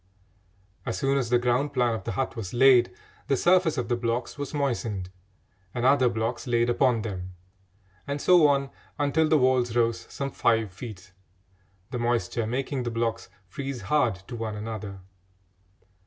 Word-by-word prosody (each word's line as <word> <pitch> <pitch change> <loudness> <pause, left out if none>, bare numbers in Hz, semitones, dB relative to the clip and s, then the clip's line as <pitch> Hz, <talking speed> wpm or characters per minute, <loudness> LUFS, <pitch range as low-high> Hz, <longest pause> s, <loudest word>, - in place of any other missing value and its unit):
As 115 - -3
soon 135 0 +1
as 120 -4 -2
the 120 - +4
ground 125 +4 0
plan 125 -3 +2
of 110 -4 -5
the - - -3
hut 135 -1 -2
was 110 -2 -6
laid, 125 -1 +6 0.4
the 135 - +2
surface 175 -2 +3
of 125 -2 -1
the 120 - +1
blocks 120 +1 -2
was 145 -2 -5
moistened 115 -10 -2 0.6
and 120 0 -1
other 130 -2 +5
blocks 115 +3 -3
laid 120 0 +2
upon 120 -3 +2
them, 95 -4 -5 0.7
and 140 +1 -2
so 175 -1 +6
on 140 -1 +1 0.3
until 150 +2 +2
the 155 - +5
walls 130 -3 +2
rose 115 -1 +1
some 140 0 -4
five 115 -5 +1
feet, 95 -3 -10 0.8
the 125 - -3
moisture 120 -2 0
making 130 +3 -2
the 120 - -2
blocks 115 -1 -2 0.2
freeze 135 +6 -5
hard 125 0 +2
to - - -6
one 110 -2 -4
another. 105 -2 -6
120 Hz, 165 wpm, -26 LUFS, 115-135 Hz, 0.8 s, laid